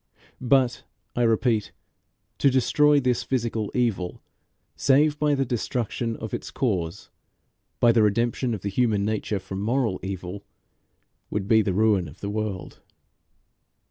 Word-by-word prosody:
But, 130 -1 +2 0.3
I 120 - 0
repeat, 115 -1 +2 0.7
to 140 - +5
destroy 145 +3 +4
this 125 -3 +1
physical 115 -4 -2
evil 110 -8 -1 0.6
save 145 +2 +3
by 150 -1 +2
the 135 -1 0
destruction 120 -1 -2
of 110 - -7
its - - -4
cause, 95 - -2 0.7
by 120 - +6
the 115 -1 +3
redemption 115 +3 +1
of 100 - -8
the 100 - -3
human 105 -2 +1
nature 110 -1 -1
from 95 +1 -6
moral 115 -2 0
evil, 95 +1 -6 0.9
would 100 -2 -3
be 110 0 +5
to 100 - -1
ruin 95 -6 +1
the 100 - -4
world. 105 -3 -4
115 Hz, 135 wpm, -25 LUFS, 100-125 Hz, 0.9 s, by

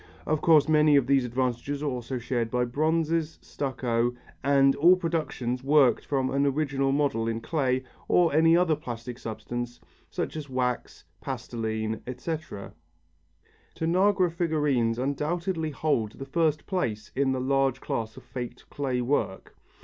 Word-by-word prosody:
Of 155 -1 0
course 155 -3 +5
many 150 -1 +5
of 140 -3 +4
these 135 -1 +3
advantages 130 +3 -2
are - - -1
also 125 -1 -3
shared 120 -1 -2
by 125 +1 +1
bronzes, 160 +4 0
stucco, 120 -3 -1 0.3
and 135 0 +4
all 175 +5 +7
productions 155 -8 -2
worked 140 -4 +4
from 135 -2 0
an 140 +1 +1
original 135 -1 0
model 135 -6 +1
in 115 0 -1
clay 130 -1 0 0.2
or 170 -4 +3
any 165 +2 +5
other 175 -3 +3
plastic 120 -4 -7
substance, 120 +2 -5 0.3
such - - -3
as 150 -3 -6
wax, 125 -1 -2 0.2
pastiline, 110 -1 -3
etc. 130 -5 -5 1.0
Tanagra 185 +2 +2
figurines 150 -9 +1
undoubtedly 160 +5 -1
hold 135 -7 -1
the 135 - -8
first 155 +1 0
place 115 - -2
in 135 0 +2
the 130 - -1
large 135 0 +1
class 110 -3 -4
of - - -11
faked 120 -1 -7
clay 130 -3 -1
work. 120 -7 -2
135 Hz, 140 wpm, -27 LUFS, 120-155 Hz, 1.0 s, all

